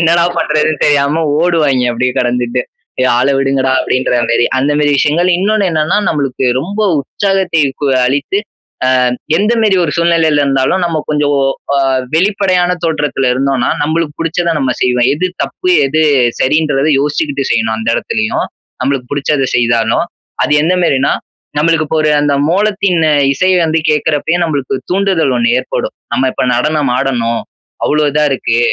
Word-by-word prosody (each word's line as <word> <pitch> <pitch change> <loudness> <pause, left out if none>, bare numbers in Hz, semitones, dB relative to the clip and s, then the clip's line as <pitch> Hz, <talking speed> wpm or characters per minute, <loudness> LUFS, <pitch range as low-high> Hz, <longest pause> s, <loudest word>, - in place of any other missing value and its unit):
என்னடா! 170 0 +3
பண்றதுன்னு 155 -1 0
தெரியாம 145 +2 +2 0.2
ஓடுவாங்க 150 -8 +1
அப்பிடியே 125 +2 -1
கடந்துட்டு. 125 0 -1 0.4
ஏ! - - +2
ஆள 130 +2 +2
விடுங்கடா! 135 -1 0
அப்பிடின்றமேரி. 120 -2 0
அந்தமாரி 145 +2 +1
விஷயங்கள், 165 +6 +1
இன்னொன்னு 205 0 +1
என்னன்னா 155 +4 +1
நம்மளுக்கு 135 -4 -2 0.2
ரொம்ப 200 +7 -5 0.2
உற்சாகத்தை 190 +1 -1 0.2
கு - - +1 0.2
அளித்து 140 +9 -1 0.5
அ - - +2 0.5
எந்த 210 +6 +1
மாரி 210 -3 +3
ஒரு 165 - 0
சூழ்நிலையில 165 -3 +2
இருந்தாலும் 135 +6 +1
நம்ம 165 -2 -1
கொஞ்சம் 150 -1 0
ஓ - - +1 0.3
அ 140 - +2 0.3
வெளிப்படையான 185 0 +1
தோற்றத்துல 150 -4 -1
இருந்தோன்னா 130 -1 0
நம்மளுக்கு 155 0 -1
புடிச்சத 165 +1 -1
நம்ம 135 -3 0
செய்வேன். 125 -1 +1
எது 160 +6 -1 0.2
தப்பு 365 - -4 0.2
எது 145 +3 0 0.4
சரின்றத 150 0 +1
யோசிச்சுக்கிட்டு 145 -1 -1
செய்யணும், 110 0 0
அந்த 110 0 -4
எடத்துலயும். 110 0 -2 0.4
நம்மளுக்கு 130 -1 -2
புடிச்சத 145 -1 0
செய்தாலும். 115 +1 +1 0.4
அது - - 0
எந்தமாரினா, 165 -5 +1 0.5
நம்மளுக்கு 160 0 +1
இப்போ 160 +1 0 0.2
அந்த 145 -1 +1
மோளத்தின் 200 -1 +1
அ - - +3 0.2
இசை 185 +6 +1
வந்து 160 0 0
கேக்குறப்பயே 155 +3 0 0.3
ஒரு 135 - -1
தூண்டுதல் 185 -7 +1
ஒண்ணு 120 0 +1
ஏற்படும். 130 - -4 0.2
நம்ம 130 +1 +1
இப்ப - - -1
நடனம் 150 +2 0
ஆடணும், 120 -4 -1 0.4
அவ்வளவு 150 -1 +1
இதா 150 +1 +2
இருக்கு, 115 -3 -1
150 Hz, 140 wpm, -13 LUFS, 130-165 Hz, 0.5 s, என்னடா